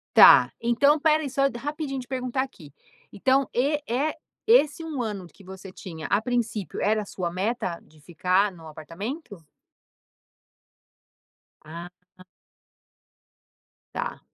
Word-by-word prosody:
Tá, - - +9
então 240 +6 +4
espera 310 0 +3
aí 280 - -4
só 275 +2 0
rapidinho 290 0 -4
de 250 - -11
perguntar 255 0 -1
aqui. 175 - -10 0.4
Então 265 +6 +2
e 285 +5 +1
é 275 +7 0 0.3
esse 335 - +4
1 310 -6 -3
ano 205 -5 -4
que 195 +3 -18
você 190 +1 -10
tinha 170 -4 -8
a 200 - +2
princípio 230 -4 -2
era 215 +1 +2
a - - -7
sua 180 -3 -4
meta 185 -1 -2
de 155 0 -22
ficar 180 +6 +1
no 165 -4 -14
apartamento? 180 - -7 2.2
Ah. 170 +3 -8 2.0
Tá. - - -4
225 Hz, 125 wpm, -25 LUFS, 185-275 Hz, 2.2 s, Tá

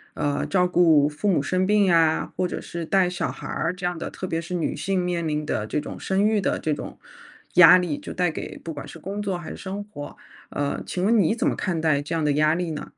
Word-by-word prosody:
呃， 145 -1 -1
照 180 -2 +2
顾 165 -5 +4
父 150 +8 -4
母 150 -7 +2
生 185 +5 0
病 210 -1 +4
呀， 165 -3 +3
或 180 - 0
者 - - -5
是 170 -1 -6
带 185 0 +2
小 180 - -2
孩 - - -9
儿 - - -1
这 180 -1 -6
样 175 -1 -1
的 - - -4
特 185 - -6
别 165 -1 -2
是 180 +2 -5
女 165 - -1
性 185 +3 -1
面 170 -2 -1
临 150 0 -2
的 105 -6 -2
这 150 - -1
种 - - -8
生 195 +2 +1
育 215 -1 +3
的 - - 0
这 155 - -1
种 - - -7 0.6
压 180 +1 +9
力， 175 -5 -1
就 - - -8
带 180 -3 +1
给 - - -7
不 165 - -7
管 145 - -8
是 - - -10
工 200 +5 -5
作 195 -3 -2
还 170 - -8
是 - - -8
生 200 +2 -5
活。 145 -9 -9 0.3
呃， 145 0 -2
请 180 - -3
问 225 +1 +4
你 195 +5 +3
怎 - - 0
么 - - +1
看 185 -5 -2
待 150 -3 +2
这 150 +3 -4
样 160 - 0
的 145 - +3
压 155 +2 +3
力 175 -2 -2
呢？ 150 - -5
175 Hz, 280 characters per minute, -24 LUFS, 155-185 Hz, 0.6 s, 压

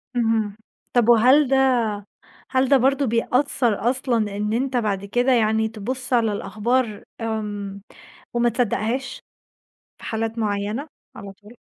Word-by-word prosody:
اهم، 225 -3 0 0.4
طَب 240 -2 +3
وهل 255 +5 +6
ده 265 -2 +3 0.7
هل 260 0 +2
ده 280 - +6
برضه 270 +2 +2
بيأثّر 235 -1 +1
أصلًا 235 -6 -1
إن 210 +1 -2
أنت 255 +3 -1
بعد 205 -4 -1
كده 245 +6 +1
يعني 220 -2 +2
تبُصّ 255 +4 -5
على 230 -3 +3
الأخبار، 215 +2 -1 0.2
امم، 205 -3 -4 0.5
وما 240 0 +2
تصدّقهاش 245 +3 -2 0.8
في - - -18
حالات 225 +1 -3
معيّنة، 210 +6 -2 0.3
على 200 -1 -9
طول؟ 210 +4 -18
230 Hz, 130 wpm, -22 LUFS, 210-255 Hz, 0.8 s, وهل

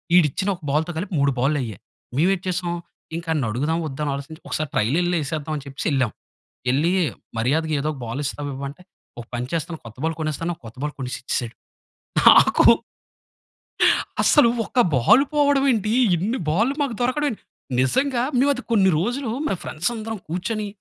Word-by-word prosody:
ఈడు 175 -4 +7
ఇచ్చిన 195 +8 -2
ఒక 180 - -19
బాల్‌తో 155 +4 +1
కలిపి, 185 +3 -4
3 140 0 +3
బాల్లు 140 +4 +2
అయ్యాయి. 110 -6 -6 0.4
మేము 160 +7 +3
ఏటి 185 -1 -4
చేసాం, 175 -1 -1 0.4
ఇంకా 170 0 -5
ఆన్ని 145 -5 0
అడుగుదామా? 150 +9 -1
వద్దా? 135 0 -6
అని 145 - 0
ఆలోచించి, 140 +3 -7
ఒకసారి 155 -1 -2
ట్రైల్ 115 +7 +1
ఎళ్లి, 175 0 +1
ఏసేద్దాం 155 +1 -3
అని 140 - -8
చెప్పేసి, 140 0 -5
ఎళ్ళాము. 130 -5 +1 0.6
ఎళ్లీ, 150 +6 +2 0.5
మర్యాదగా 155 +7 +1
ఏదో 150 - -1
ఒక 145 - -10
బాల్ 115 +5 -4
ఇస్తావా? 145 +1 -4
ఇవ్వా? 140 +1 -5
అంటే, 155 +6 -15 0.4
ఒక - - -8
పని 120 +1 -2
చేస్తాను, 165 0 -2
కొత్త 110 - -11
బాల్ 160 0 0
కొనేస్తాను. 160 +2 -2
కొత్త 115 +1 -11
బాల్ 150 0 -2
కొనేసి 130 -2 -4
ఇచ్చేసాడు. 120 -2 -2 0.7
నాకూ - - +7 1.6
అస్సలు, 295 -7 +5 0.2
ఒక 250 - -1 0.2
బాల్ 215 - +5
పోవడం 285 -2 +3
ఏంటి? 215 -1 -1 0.2
ఇన్ని 210 +10 -1
బాల్లు 225 - +2
మాకు 260 -5 -2
దొరకడం 255 +5 +1
ఏంటి? 220 - -9 0.4
నిజంగా 245 - +1 0.2
మేము, 275 +3 +4
అది 255 - -7
కొన్ని 195 -4 +5
రోజులు 245 - -1 0.2
మా - - 0
ఫ్రెండ్స్ 160 +9 -1
అందరం 220 0 -5
కూర్చొని, 210 +5 -2
160 Hz, 180 wpm, -23 LUFS, 140-215 Hz, 1.6 s, ఈడు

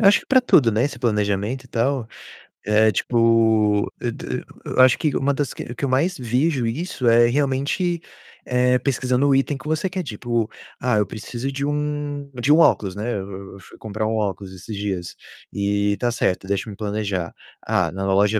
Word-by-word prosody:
Acho 200 -1 +6
que - - -19
para 260 -1 +5
tudo, 125 - +4
né, 110 +3 +2
esse 140 0 -3
planejamento 105 +2 -1
e - - -17
tal. 120 0 -1 0.6
É, 110 +1 +4
tipo, 110 -1 +2
eu 120 - -2
t - - -8 0.4
eu - - -3
acho 130 -1 +7
que 150 -4 0
uma 140 +1 +1
das 140 -1 -2
que - - -6
o 120 - -8
que 120 - -8
eu 135 - -2
mais 165 +8 +1
vejo 130 +2 0
isso 130 +2 -2
é 120 +1 +6
realmente, 145 +7 0 0.4
eh, 125 0 +2
pesquisando 130 +1 +1
o 140 - +4
item 135 +1 +1
que 135 - -11
você 155 +4 0
quer, 185 0 -3
tipo: 120 -2 -2 0.3
"Ah, 125 -2 +1
eu 105 - +2
preciso 120 +6 -5
de 140 +1 -3
um 145 -1 -3
de 140 +5 +3
um 160 - +5
óculos", 100 - +3
né. 110 +4 -3
Eu 95 0 -7
eu - - -12
fui 95 - -16
comprar 110 0 -3
um 110 - -1
óculos 100 -3 -3
esses 100 +4 -8
dias. 95 -4 -4 0.4
Eh, 100 0 0
"tá 120 - +1
certo, 95 -5 -1
deixa-me 100 +1 -2
planejar. 100 -4 -3 0.3
Ah - - +1
na 95 +2 -4
loja 105 +2 +3
120 Hz, 195 wpm, -22 LUFS, 105-140 Hz, 0.6 s, acho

